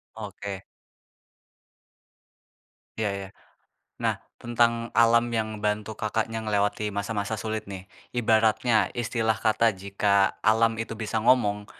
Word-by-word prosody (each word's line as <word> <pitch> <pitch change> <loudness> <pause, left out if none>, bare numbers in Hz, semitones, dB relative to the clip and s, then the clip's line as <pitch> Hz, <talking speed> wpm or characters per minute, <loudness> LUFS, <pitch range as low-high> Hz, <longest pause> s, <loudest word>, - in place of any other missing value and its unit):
Oke. 100 -2 -7 2.3
Iya 110 -2 0
iya. 100 -1 -5 0.7
Nah, - - +1 0.2
tentang 120 0 +2 0.2
alam 115 0 +5
yang 110 -1 -2
ngebantu 105 +1 -2
Kakaknya 110 +1 -1
ngelewati 105 0 0
masa-masa 100 +1 -2
sulit 110 -1 -3
nih, 95 -2 -7 0.3
ibaratnya 110 0 +3
istilah 115 -2 0
kata 110 0 +3
jika 100 0 +2
alam 115 0 +3
itu 115 0 -4
bisa 110 0 -2
ngomong, 105 -5 +3
110 Hz, 105 wpm, -26 LUFS, 105-115 Hz, 2.3 s, alam